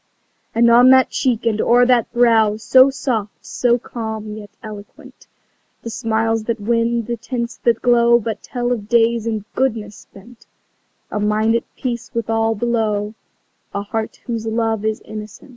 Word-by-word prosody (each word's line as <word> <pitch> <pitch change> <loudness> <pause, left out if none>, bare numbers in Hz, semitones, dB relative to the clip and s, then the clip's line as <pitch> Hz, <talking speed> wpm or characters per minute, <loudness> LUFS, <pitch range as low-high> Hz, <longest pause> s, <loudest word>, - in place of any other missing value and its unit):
And 235 +1 +4
on 245 +2 +7
that 260 0 +5
cheek 240 -3 -1
and 220 -2 +1
o'er 245 +1 +4
that 245 -2 +2
brow 225 -3 +3
So 260 +4 +5
soft, 230 -6 -4
so 240 -1 +1
calm 220 -3 -6
yet 210 -1 -10
eloquent, 210 -2 -12 0.6
The 230 - -6
smiles 225 -1 -1
that 230 0 -2
win, 230 +2 0
the 235 +1 -3
tints 235 0 -4
that 235 -2 0
glow 235 -1 +5
But 225 -1 -4
tell 245 -1 -3
of 215 -4 -3
days 230 -1 +2
in 215 -3 -3
goodness 220 -6 -1
spent 230 +4 -17 0.6
A 210 - -2
mind 215 +2 +1
at 235 - 0
peace 240 -2 -4
with 230 -1 -2
all 225 0 +1
below, 215 -2 -1 0.6
A 200 - -2
heart 220 +2 -5
whose 230 -2 -4
love 225 -1 -1
is 220 0 -1
innocent. 215 +3 -10
225 Hz, 160 wpm, -19 LUFS, 215-235 Hz, 0.6 s, on